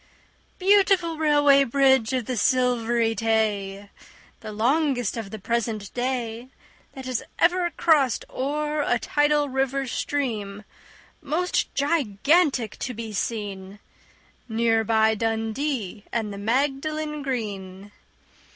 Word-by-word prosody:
Beautiful 380 Hz, -4 st, +3 dB
Railway 290 Hz, -2 st, +5 dB
Bridge 265 Hz, -2 st, +3 dB
of 255 Hz, -3 st, -1 dB
the 255 Hz, -, -3 dB
Silvery 240 Hz, -1 st, +1 dB
Tay! 205 Hz, -3 st, -1 dB, 0.5 s
The 215 Hz, -, -8 dB
longest 245 Hz, +1 st, +1 dB
of 225 Hz, -4 st, -5 dB
the 220 Hz, -, -7 dB
present 215 Hz, -1 st, -3 dB
day 245 Hz, -1 st, -3 dB, 0.4 s
That 265 Hz, -2 st, -9 dB
has 255 Hz, -2 st, -2 dB, 0.2 s
ever 350 Hz, +1 st, +2 dB
crossed 300 Hz, -8 st, +2 dB
o'er 300 Hz, +3 st, -2 dB
a 245 Hz, -4 st, +1 dB
tidal 295 Hz, +3 st, +1 dB
river 270 Hz, 0 st, -1 dB
stream, 220 Hz, -7 st, -3 dB, 0.6 s
Most 320 Hz, +5 st, -1 dB
gigantic 280 Hz, -, +1 dB
to 250 Hz, -, -4 dB
be 225 Hz, -1 st, -6 dB
seen, 200 Hz, -2 st, -4 dB, 0.7 s
Near 225 Hz, 0 st, +2 dB
by 220 Hz, 0 st, +3 dB
Dundee 225 Hz, 0 st, -2 dB
and 220 Hz, -3 st, -2 dB
the 200 Hz, -, -7 dB
Magdalen 290 Hz, +6 st, -1 dB
Green. 205 Hz, -7 st, -5 dB
245 Hz, 110 wpm, -24 LUFS, 220-290 Hz, 0.7 s, Railway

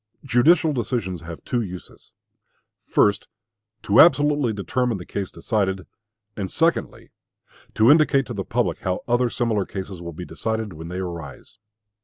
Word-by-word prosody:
Judicial 155 Hz, +5 st, +4 dB
decisions 110 Hz, -, -2 dB
have 85 Hz, 0 st, -9 dB
two 120 Hz, -, -1 dB
uses 90 Hz, -4 st, -9 dB, 0.7 s
first, 100 Hz, -1 st, +2 dB, 0.6 s
to 100 Hz, -, +3 dB
absolutely 145 Hz, -6 st, +5 dB
determine 115 Hz, +3 st, -1 dB
the 90 Hz, -, -9 dB
case 100 Hz, -2 st, -4 dB
decided, 95 Hz, -4 st, -2 dB, 0.5 s
and, 95 Hz, -3 st, -4 dB
secondly, 165 Hz, +1 st, -1 dB, 0.6 s
to 110 Hz, +5 st, +6 dB
indicate 145 Hz, -3 st, +4 dB
to -, -, -6 dB
the -, -, -3 dB
public -, -, -1 dB
how 90 Hz, 0 st, -2 dB
other 120 Hz, 0 st, +2 dB
similar 115 Hz, -4 st, 0 dB
cases 95 Hz, -2 st, -7 dB
will 85 Hz, 0 st, -6 dB
be 90 Hz, +2 st, -8 dB
decided 110 Hz, +4 st, -3 dB
when 80 Hz, +1 st, -9 dB
they 90 Hz, +2 st, -5 dB
arise. 90 Hz, +2 st, -7 dB
105 Hz, 145 wpm, -23 LUFS, 95-125 Hz, 0.7 s, to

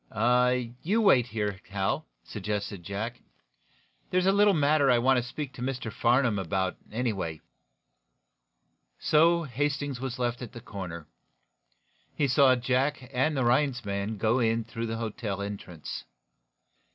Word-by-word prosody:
"You 205 Hz, +7 st, +2 dB
wait 130 Hz, -, +5 dB
here, 105 Hz, -5 st, -3 dB
Hal," 95 Hz, -1 st, -1 dB, 0.2 s
suggested 100 Hz, -2 st, -4 dB
Jack. 105 Hz, +7 st, -5 dB, 0.9 s
"There's 185 Hz, 0 st, +2 dB
a 195 Hz, -, +5 dB
little 200 Hz, 0 st, +4 dB
matter 145 Hz, -1 st, +3 dB
I 125 Hz, -, +5 dB
want 130 Hz, +2 st, +3 dB
to -, -, +2 dB
speak 130 Hz, +3 st, -6 dB
to 120 Hz, -, -10 dB
Mr. 125 Hz, -3 st, -3 dB
Farnum 120 Hz, -3 st, +2 dB
about, 95 Hz, 0 st, -1 dB, 0.2 s
anyway." 105 Hz, -9 st, -2 dB, 1.6 s
So 170 Hz, +2 st, +4 dB
Hastings 145 Hz, -1 st, -2 dB
was 130 Hz, -2 st, -4 dB
left 120 Hz, 0 st, -1 dB
at 125 Hz, -1 st, -7 dB
the 120 Hz, -, -8 dB
corner. 90 Hz, -8 st, -7 dB, 1.1 s
He 145 Hz, -, +2 dB
saw 130 Hz, -1 st, +5 dB
Jack 130 Hz, +2 st, -1 dB
and 140 Hz, +4 st, +1 dB
the 130 Hz, -, +1 dB
Rhinds 125 Hz, -1 st, +2 dB
man 100 Hz, +2 st, -2 dB
go 115 Hz, +5 st, +2 dB
in 115 Hz, -1 st, +1 dB
through 115 Hz, +1 st, -5 dB
the 115 Hz, 0 st, -3 dB
hotel 110 Hz, -3 st, -4 dB
entrance. 100 Hz, -5 st, -6 dB
120 Hz, 140 wpm, -28 LUFS, 105-135 Hz, 1.6 s, wait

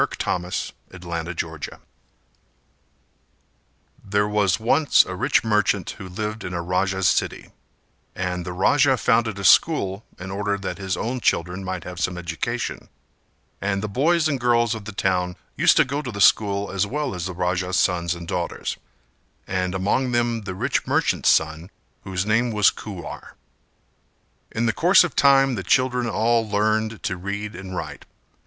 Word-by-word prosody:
Kuwar 90 Hz, 0 st, -2 dB, 0.4 s
and 90 Hz, -1 st, -12 dB
the -, -, -10 dB
Raja's 85 Hz, 0 st, -4 dB
Daughter. 80 Hz, -2 st, -5 dB, 2.2 s
There 100 Hz, +1 st, +1 dB
was 105 Hz, -3 st, +1 dB
once 140 Hz, +7 st, +4 dB
a -, -, -6 dB
rich -, -, +1 dB
merchant 105 Hz, -4 st, +1 dB
who 95 Hz, -3 st, -9 dB
lived 105 Hz, +4 st, -4 dB
in 90 Hz, -, -5 dB
a 85 Hz, -, -2 dB
Raja's 95 Hz, +1 st, 0 dB
city; -, -, -1 dB, 0.6 s
and 90 Hz, -1 st, -3 dB
the 90 Hz, -, -5 dB
Raja 135 Hz, +9 st, +3 dB
founded 115 Hz, -3 st, +1 dB
a 100 Hz, -, -6 dB
school 100 Hz, -, +4 dB
in 95 Hz, +1 st, -7 dB
order 100 Hz, +1 st, -1 dB
that 100 Hz, +1 st, -5 dB
his 95 Hz, -2 st, -2 dB
own 125 Hz, +3 st, -2 dB
children 90 Hz, -3 st, 0 dB
might 95 Hz, -2 st, -4 dB
have 90 Hz, +1 st, -8 dB
some 90 Hz, 0 st, -1 dB
education, 85 Hz, -3 st, -4 dB, 0.7 s
and 100 Hz, 0 st, -1 dB
the -, -, -1 dB
boys 155 Hz, -, +2 dB
and 140 Hz, -4 st, -1 dB
the -, -, -14 dB
girls 120 Hz, -1 st, +3 dB
of 110 Hz, -2 st, -7 dB
the 110 Hz, -, -6 dB
town 90 Hz, -3 st, -1 dB, 0.2 s
used -, -, +4 dB
to -, -, +6 dB
go 140 Hz, +2 st, -3 dB
to 130 Hz, -5 st, -6 dB
the 100 Hz, -, -7 dB
school 100 Hz, 0 st, +3 dB
as 100 Hz, +1 st, 0 dB
well 145 Hz, +3 st, -2 dB
as 90 Hz, 0 st, -4 dB
the 95 Hz, -, -5 dB
Raja's 90 Hz, +1 st, -1 dB
sons 85 Hz, -2 st, +1 dB
and 85 Hz, -1 st, -9 dB
daughters -, -, -3 dB, 0.7 s
and 90 Hz, 0 st, -2 dB
among 120 Hz, +7 st, 0 dB
them 120 Hz, -1 st, +1 dB
the 95 Hz, -2 st, -5 dB
rich -, -, -1 dB
merchant's -, -, +2 dB
son, 80 Hz, +2 st, +1 dB, 0.4 s
whose 95 Hz, 0 st, -2 dB
name 115 Hz, +3 st, +2 dB
Was 105 Hz, -3 st, +4 dB
Kuwar. -, -, -9 dB, 1.2 s
In 115 Hz, +1 st, -1 dB
the 115 Hz, -, +1 dB
course 180 Hz, +4 st, +5 dB
of 175 Hz, -6 st, -4 dB
time 135 Hz, -1 st, +5 dB
the 105 Hz, -, -3 dB
children 125 Hz, +4 st, +1 dB
all 115 Hz, 0 st, +1 dB
learned 110 Hz, +1 st, 0 dB
to 90 Hz, -, -2 dB
read 100 Hz, +3 st, -5 dB
and 95 Hz, 0 st, -7 dB
write. -, -, -6 dB
100 Hz, 170 wpm, -23 LUFS, 90-115 Hz, 2.2 s, to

